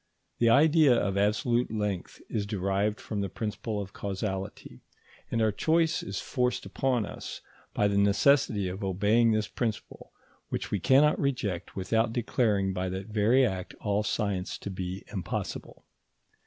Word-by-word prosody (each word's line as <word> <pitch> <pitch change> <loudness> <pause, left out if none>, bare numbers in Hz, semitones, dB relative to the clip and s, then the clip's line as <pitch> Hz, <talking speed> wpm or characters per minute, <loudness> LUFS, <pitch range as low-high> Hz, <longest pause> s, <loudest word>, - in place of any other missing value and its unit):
The 115 - +4
idea 150 +1 +6
of 100 -4 0
absolute 110 +4 +1
length 105 -4 -3
is 105 -2 -2
derived 100 +1 0
from 105 -2 -4
the 100 - -2
principle 105 +1 -4
of 100 -1 -6
causality; 95 -1 -5 0.5
and 115 -1 +1
our 110 - +3
choice 165 - +1
is 175 - -4
forced 125 -2 -1
upon 125 -5 0
us - - -8 0.3
by 105 - +3
the 100 0 +1
necessity 100 +1 +3
of 95 +3 -5
obeying 105 +5 +3
this 110 -1 +1
principle, 115 -4 -4 0.4
which - - -4
we 100 - 0
cannot 140 - +4
reject 110 - -2
without 110 +4 0
declaring 105 -5 +1
by 95 0 -2
that 95 +3 -5
very 110 +5 +4
act 95 -5 -4
all 105 0 0
science 100 -3 -2
to 100 - -6
be 95 +1 -5
impossible. 95 -5 -5
105 Hz, 150 wpm, -28 LUFS, 100-120 Hz, 0.5 s, idea